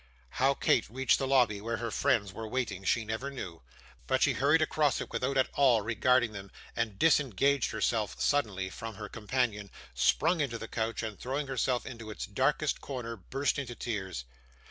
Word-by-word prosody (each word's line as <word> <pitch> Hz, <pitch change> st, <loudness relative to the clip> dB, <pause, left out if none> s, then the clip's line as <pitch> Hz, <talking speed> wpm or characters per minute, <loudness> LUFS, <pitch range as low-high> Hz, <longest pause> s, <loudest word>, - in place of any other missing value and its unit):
How 135 Hz, +1 st, +4 dB
Kate 120 Hz, -, +2 dB
reached 130 Hz, +3 st, +2 dB
the 135 Hz, -, -1 dB
lobby 125 Hz, -7 st, +3 dB
where 115 Hz, +2 st, -2 dB
her 115 Hz, -1 st, -3 dB
friends 105 Hz, -5 st, +1 dB
were 110 Hz, +2 st, -6 dB
waiting 115 Hz, -5 st, -2 dB
she 110 Hz, +3 st, +1 dB
never 110 Hz, +6 st, -3 dB
knew, 90 Hz, -12 st, -7 dB, 0.5 s
but -, -, +2 dB
she -, -, +4 dB
hurried 150 Hz, +4 st, +3 dB
across 150 Hz, -2 st, +1 dB
it -, -, -6 dB
without 135 Hz, +2 st, -1 dB
at 130 Hz, -, +4 dB
all 125 Hz, -6 st, +4 dB
regarding 120 Hz, +1 st, +2 dB
them, 100 Hz, -2 st, -8 dB, 0.3 s
and 110 Hz, -4 st, -2 dB
disengaged 140 Hz, -3 st, +3 dB
herself 110 Hz, -4 st, -1 dB
suddenly 100 Hz, -10 st, 0 dB
from 115 Hz, +2 st, -7 dB
her 105 Hz, 0 st, -6 dB
companion, 110 Hz, -2 st, -1 dB, 0.2 s
sprang 155 Hz, -, +2 dB
into 120 Hz, -5 st, -1 dB
the 115 Hz, -, -7 dB
coach, 115 Hz, +1 st, -2 dB
and 110 Hz, -2 st, -5 dB
throwing 135 Hz, +4 st, -2 dB
herself 130 Hz, -2 st, 0 dB
into 115 Hz, -4 st, -8 dB
its 105 Hz, -, -5 dB
darkest -, -, 0 dB
corner 125 Hz, -4 st, -5 dB
burst 135 Hz, +8 st, -1 dB
into 125 Hz, -3 st, -5 dB
tears. 95 Hz, -, -4 dB
120 Hz, 180 wpm, -30 LUFS, 105-135 Hz, 0.5 s, How